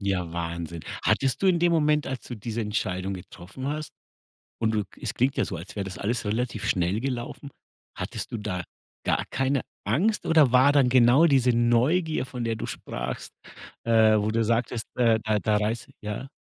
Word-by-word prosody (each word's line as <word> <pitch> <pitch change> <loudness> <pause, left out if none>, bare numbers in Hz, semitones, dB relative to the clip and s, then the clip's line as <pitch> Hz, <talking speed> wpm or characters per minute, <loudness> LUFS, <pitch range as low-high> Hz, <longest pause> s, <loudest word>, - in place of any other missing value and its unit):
Ja, 95 -4 -1
Wahnsinn. 85 -1 -4 0.2
Hattest 135 +5 +1
du - - +4
in 180 -2 +4
dem 175 0 +3
Moment, 150 -2 +2
als 130 -1 -4
du 125 - -4
diese 115 +2 -4
Entscheidung 100 -3 -2
getroffen 95 +7 -9
hast 150 +1 -3 0.7
und 110 -1 +1
du 105 -1 0
k - - -21
es - - -2
klingt 130 +3 +1
ja 130 - +2
so, - - -5
als 85 +5 -9
wär 100 - -2
das 95 -3 -7
alles 115 +2 -1
relativ 110 0 -2
schnell 90 +4 +1
gelaufen, 130 +2 -4 0.5
hattest - - -5
du 115 - -2
da 90 -4 -3 0.4
gar - - +1
keine 135 0 +1 0.3
Angst 185 - +1
oder 155 -5 +5
war 130 +3 +6
dann 140 -3 +4
genau 125 +5 +6
diese 130 -4 +4
Neugier, 125 +8 +2
von 125 -2 -6
der 115 -1 -1
du - - -5
sprachst, 65 +1 -5 0.5
äh, 110 -2 +5
wo 105 +1 0
du 115 +1 +1
sagtest, 115 0 0
äh, 115 -3 +4
da 110 -1 +2
da 105 -1 +2
reiß 110 +5 -2
ja? 105 +5 -5
115 Hz, 190 wpm, -26 LUFS, 105-135 Hz, 0.7 s, war